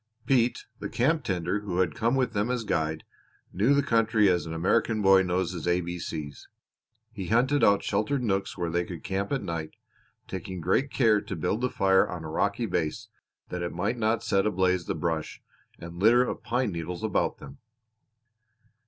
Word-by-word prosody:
Pete, 125 -3 +2
the - - -4
Mexican 120 - -1
camp 160 -2 +1
tender 90 +1 -1
who 100 -4 -4
had 95 -1 +2
come 115 +3 +1
with 130 -3 0
them 105 +2 0
as 125 -2 -1
guide, 80 -5 -1 0.5
knew 110 +10 +3
the 140 - +3
country 110 -4 +3
as 90 -2 +1
an 80 - -5
American 110 +6 +1
boy 95 0 +6
knows 90 -1 0
his 85 -2 -5
A 90 0 +3
B 85 0 -5
C's. 75 -3 -6 0.6
He 100 -5 -6
hunted 130 +6 +2
out 100 0 +4
sheltered 110 +7 0
nooks 100 -4 -1
where 85 -2 -2
they 85 +1 +1
could 85 -3 -8
camp 100 +1 -2
at 135 -5 -1
night, 85 -4 -5 0.5
taking 95 0 -6
great 95 - +1
care 110 -6 +3
to - - -6
build 90 +8 -1
the 125 - +1
fire 95 -6 +3
on 85 -3 -6
a 80 - -6
rocky 100 +7 0
base 90 +3 -2 0.4
that 90 - -4
it 85 - -3
might 105 +7 -1
not 110 +1 +1
set 100 +1 +2
ablaze 90 -3 +1
the - - -1
brush 80 -3 -3 0.4
and 85 +1 -9
litter 120 +5 +5
of - - -4
pine 125 -2 -1
needles 85 +1 -5
about - - 0
them. 70 0 -12
95 Hz, 195 wpm, -27 LUFS, 85-115 Hz, 0.6 s, boy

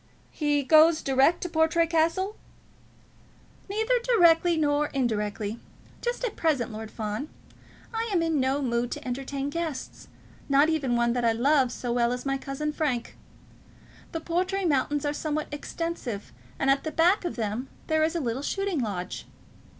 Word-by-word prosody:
"He 295 -2 +1
goes 315 +3 +6
direct 275 +5 +3
to 355 - -3
Portray 320 +1 +3
Castle?" 335 +5 +1 1.3
"Neither 445 +5 +1
directly 350 -8 +4
nor 295 -1 +2
indirectly. 215 -4 -2 0.4
Just 485 +1 -2
at 485 - -2
present, 280 -8 0
Lord 220 0 -7
Fawn, 215 +7 -4 0.6
I 455 +1 -2
am 350 -4 +2
in 325 -3 +1
no 270 +2 +1
mood 240 -1 0
to - - -8
entertain 275 +2 -3
guests, 320 -5 -5 0.4
not 280 +3 +5
even 280 -7 0
one 235 0 +2
that 245 -1 -1
I 230 -1 +3
love 260 +2 +3
so 245 -1 -3
well 240 0 +2
as 250 +1 -4
my 275 0 0
cousin 290 +3 -3
Frank. 270 -7 -2 1.0
The 325 - -4
Portray 365 +4 -1
mountains 290 -1 +1
are 290 - 0
somewhat 305 0 -2
extensive, 290 -8 -4 0.3
and 270 0 +3
at 275 0 +1
the 315 - -2
back 355 +7 +3
of 345 - -3
them 225 +3 -3 0.2
there 315 -1 +1
is 320 +2 0
a - - +1
little 250 -2 -2
shooting 390 +1 -1
lodge." 200 -7 -4
290 Hz, 160 wpm, -27 LUFS, 245-330 Hz, 1.3 s, goes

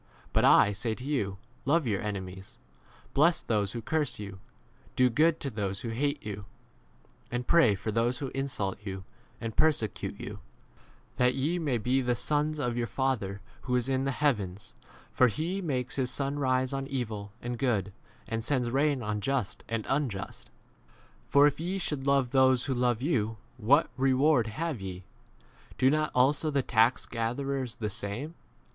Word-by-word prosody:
But - - +3
I 105 - +6
say 110 +2 -2
to 125 - -10
you, 125 -9 -1 0.3
Love 150 +4 +2
your 105 -5 0
enemies, 95 -2 -6 0.6
[bless 165 +4 +4
those 105 -3 0
who 115 - -5
curse 150 +2 -1
you, 100 -2 -7 0.6
do 125 -1 +4
good 155 +6 +3
to 140 - -2
those 100 -3 -3
who 115 - -4
hate 140 +4 -1
you,]r 100 -1 -5 0.8
and 120 0 -3
pray 140 -11 +5
for 100 +3 -3
those 115 +3 +1
who 135 +1 -4
insult 130 -9 -2
45 105 - -12
you 95 -1 -5 0.4
and 115 -2 -5
persecute 150 -10 +1
you, - - -7 0.8
that 125 0 +3
ye 155 +7 0
may 145 -7 0
be 125 +4 +1
the 125 -1 +1
sons 150 +3 0
of 125 -5 -1
your 120 -1 -1
Father 110 -8 -1 0.2
who 125 -1 0
[is] 125 0 +1
in 135 -1 +1
the 135 - +1
heavens; 105 -10 0 0.4
for 125 - +5
he 165 - -2
makes 130 -8 -2
his 130 -2 0
sun 140 +2 -2
rise 130 -1 +1
on 135 0 -3
evil 110 -7 -4
and 120 -1 -5
good, 105 -7 0 0.3
and 115 0 -2
sends 125 -1 0
rain 140 -1 +1
on 105 0 -2
just 135 -4 -1
and 115 -2 -2
40 135 - +1
unjust. 120 -10 -5 0.8
For 140 +1 +6
if 145 - +2
ye 180 +4 -2
should 150 -7 -3
love 135 -3 +3
those 130 -2 +4
who 135 - 0
love 125 -1 +1
you, 115 -8 0 0.2
what 130 +7 +3
reward 130 -1 +3
have 140 +2 -3
ye? 95 -1 -6 0.7
Do 130 +1 +4
not 155 0 +1
also 145 +5 +3
the 140 -3 +1
tax 115 0 +3
4 - - -23
7 - - -10
gatherers 125 +2 -2
the 110 -4 -3
same 110 - -4
125 Hz, 180 wpm, -29 LUFS, 110-140 Hz, 0.8 s, I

